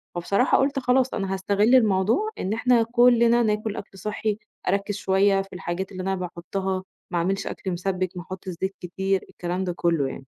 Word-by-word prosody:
فبصراحة 200 Hz, +8 st, +2 dB
قُلت 275 Hz, 0 st, +1 dB
خلاص 255 Hz, 0 st, +2 dB
أنا 195 Hz, -2 st, -2 dB
هاستغِلّ 205 Hz, +5 st, +3 dB
الموضوع 220 Hz, -, +3 dB
إن 195 Hz, +3 st, -1 dB
إحنا 235 Hz, 0 st, +3 dB
كُلّنا 235 Hz, 0 st, +4 dB
ناكل 210 Hz, 0 st, -1 dB
أكل 195 Hz, -1 st, -9 dB
صحّي، 210 Hz, +1 st, -2 dB, 0.3 s
أركِّز 200 Hz, +1 st, 0 dB
شوية 195 Hz, 0 st, +3 dB
في 195 Hz, 0 st, -11 dB
الحاجات 180 Hz, +1 st, -4 dB
اللي 185 Hz, -1 st, -5 dB
أنا 190 Hz, 0 st, 0 dB
باحطّها، 185 Hz, +2 st, -3 dB, 0.3 s
ما 175 Hz, -, 0 dB
أعملش 190 Hz, +3 st, 0 dB
أكل 190 Hz, -, -4 dB
مسبِّك، 185 Hz, +1 st, -1 dB
ما -, -, -4 dB
أحطش 185 Hz, +1 st, -8 dB
زيت 190 Hz, +1 st, -1 dB
كتير، 190 Hz, +2 st, -1 dB
الكلام 180 Hz, +2 st, -3 dB
ده 180 Hz, -2 st, -2 dB
كُلّه 165 Hz, -5 st, +1 dB
يعني. 135 Hz, 0 st, -8 dB
195 Hz, 180 wpm, -24 LUFS, 185-220 Hz, 0.3 s, كُلّنا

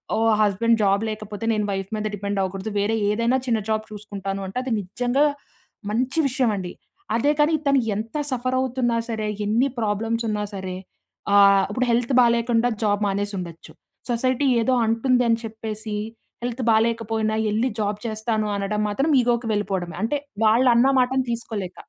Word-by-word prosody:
ఓ -, -, 0 dB, 0.2 s
husband 225 Hz, +3 st, +2 dB
job 200 Hz, 0 st, +3 dB
లేకపోతే 215 Hz, 0 st, -6 dB
నేను 210 Hz, -1 st, 0 dB
wife 195 Hz, 0 st, -3 dB
మీద 215 Hz, -, -3 dB
డిపెండ్ 200 Hz, 0 st, -3 dB
అవ్వకూడదు. 195 Hz, +3 st, -4 dB
వేరే 210 Hz, +2 st, +1 dB
ఏదైనా 230 Hz, +4 st, +2 dB
చిన్న 225 Hz, -2 st, +2 dB
జాబ్ 215 Hz, 0 st, 0 dB
చూసుకుంటాను 200 Hz, -2 st, -5 dB
అంటే 190 Hz, -, -7 dB
అది 255 Hz, -3 st, -2 dB
నిజంగా 245 Hz, +9 st, 0 dB, 0.7 s
మంచి 255 Hz, +8 st, 0 dB
విషయం 255 Hz, -3 st, +1 dB
అండి. 180 Hz, -2 st, -5 dB, 0.4 s
అదే 280 Hz, +6 st, +3 dB
కాని 300 Hz, +2 st, +4 dB
తను 275 Hz, -1 st, +4 dB, 0.2 s
ఎంత 220 Hz, +7 st, -4 dB
సఫర్ 255 Hz, 0 st, -1 dB
అవుతున్నా 250 Hz, -2 st, 0 dB
సరే, 220 Hz, -1 st, -2 dB, 0.2 s
ఎన్ని 230 Hz, +6 st, +2 dB
ప్రాబ్లమ్స్ 225 Hz, +2 st, -1 dB
ఉన్నా 210 Hz, -1 st, -1 dB
సరే, 190 Hz, -2 st, -5 dB, 0.6 s
ఆహ్, 200 Hz, -1 st, +6 dB
ఇప్పుడు 250 Hz, +3 st, 0 dB
హెల్త్ 240 Hz, +2 st, +1 dB
బాలేకుండా 235 Hz, 0 st, +2 dB
జాబ్ 205 Hz, -1 st, +1 dB
మానేసి 205 Hz, +1 st, -1 dB
ఉండొచ్చు. 170 Hz, -2 st, -9 dB, 0.4 s
సొసైటీ 255 Hz, +3 st, +1 dB
ఏదో 255 Hz, +3 st, +2 dB
అంటుంది 245 Hz, +3 st, +2 dB
అని 230 Hz, 0 st, +2 dB
చెప్పేసి 220 Hz, -1 st, -6 dB, 0.5 s
హెల్త్ 245 Hz, +1 st, -3 dB
బాలేకపోయినా 225 Hz, -1 st, +1 dB
వెళ్లి 220 Hz, +4 st, +1 dB
జాబ్ 205 Hz, 0 st, -1 dB
చేస్తాను 220 Hz, -1 st, -1 dB
అనడం 200 Hz, +1 st, -1 dB
మాత్రం 270 Hz, +10 st, 0 dB
ఇగోకి 240 Hz, -1 st, 0 dB
వెళ్ళిపోవడమే. 190 Hz, -5 st, -2 dB
అంటే 245 Hz, +6 st, 0 dB, 0.3 s
వాళ్ళు 235 Hz, +4 st, +5 dB
అన్న 240 Hz, +3 st, +5 dB
మాటను 260 Hz, +1 st, +2 dB
తీసుకోలేక. 215 Hz, -6 st, -4 dB
220 Hz, 155 wpm, -23 LUFS, 205-240 Hz, 0.7 s, ఆహ్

